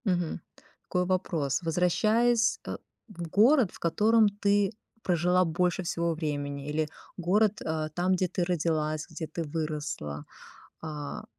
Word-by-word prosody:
Мгм. 175 -4 0 0.4
Такой 180 0 0
вопрос. 170 -7 0
Возвращаясь, 220 +8 +2
э, - - -3 0.3
в 175 -6 -7
город, 230 - +5
в - - -14
котором 215 +6 +4
ты 200 0 +3 0.3
прожила 180 +1 +3
больше 175 +3 0
всего 170 0 0
времени, 145 -3 -3
или 155 +1 0 0.3
город, 205 +4 +2
э, 155 -1 -2
там, 180 +1 +2
где 185 0 +1
ты 180 - -1
родилась, 155 -3 -1
где 160 0 -5
ты 165 +2 -4
выросла, 150 - -4 0.6
а 150 -2 -6
175 Hz, 130 wpm, -28 LUFS, 155-190 Hz, 0.6 s, город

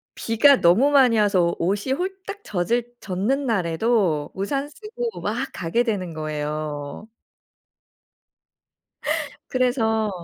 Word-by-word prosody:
비가 250 +5 +4
너무 210 +12 +5
많이 255 -5 +5
와서 185 -5 +3
오 165 - 0
옷이 205 +6 -2
홀딱 380 +6 -4
젖을 230 +6 -1
젖는 215 +10 -1
날에도 185 - +1
우산 275 +9 -2
쓰고 455 +7 -6
막 240 +6 -2
가게 180 +9 0
되는 190 -7 -2
거예요. 150 +2 -4 2.4
그래서 225 -4 +1
220 Hz, 205 characters per minute, -23 LUFS, 175-265 Hz, 2.4 s, 너무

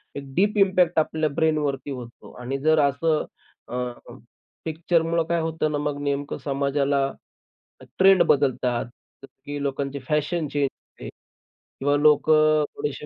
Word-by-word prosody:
एक 140 - -5
deep 205 +3 +2
impact 185 -4 +3
आपल्या 155 0 0
ब्रेनवरती 145 -2 -1
होतो. 120 -2 -9
आणि 130 +3 -3
जर 155 +2 +3
असं 150 +2 +1 0.5
अ 125 0 -2 0.8
पिक्चरमुळे 165 +1 0
काय 170 0 +1
होतं 160 -1 -1
ना, 145 - -1
मग 145 -1 -2
नेमकं 140 0 -2
समाजाला 140 0 0 1.0
ट्रेंड 190 -1 +6
बदलतात, 130 -4 +1 0.4
जसं 135 - -10 0.2
की 145 0 -4
लोकांची 140 0 -3
फॅशन 150 +2 0
चेंज 145 -1 0
होते - - -13 0.7
किंवा 145 +1 +2
लोकं 155 +1 +4
थोडेसे 145 0 -4
150 Hz, 130 wpm, -24 LUFS, 140-160 Hz, 1.0 s, ट्रेंड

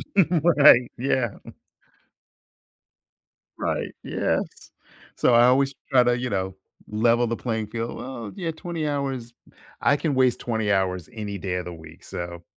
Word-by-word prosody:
Right. 155 -8 +5
Yeah. 125 -3 0 2.2
Right. - - -2
Yes. - - -2 0.4
So 125 - +3
I 120 +1 +7
always 135 +2 +3 0.2
try 125 -2 +6
to, 120 0 +2
you 125 0 -3
know, 95 -1 -2 0.3
level 115 +2 +2
the 115 - -1
playing 110 -3 -3
field. 115 +1 -4
Well, 120 -5 -7
yeah, 170 -4 -3
20 160 -1 -4
hours 135 -5 -3 0.5
I 140 - +4
can 145 -4 -1
waste 130 -2 +3
20 110 -3 -1
hours 90 -2 0
any 105 -3 -5
day 90 0 -3
of 90 -1 -3
the 90 - -6
week, 80 0 -13
so 85 0 -7
120 Hz, 145 wpm, -24 LUFS, 100-135 Hz, 2.2 s, I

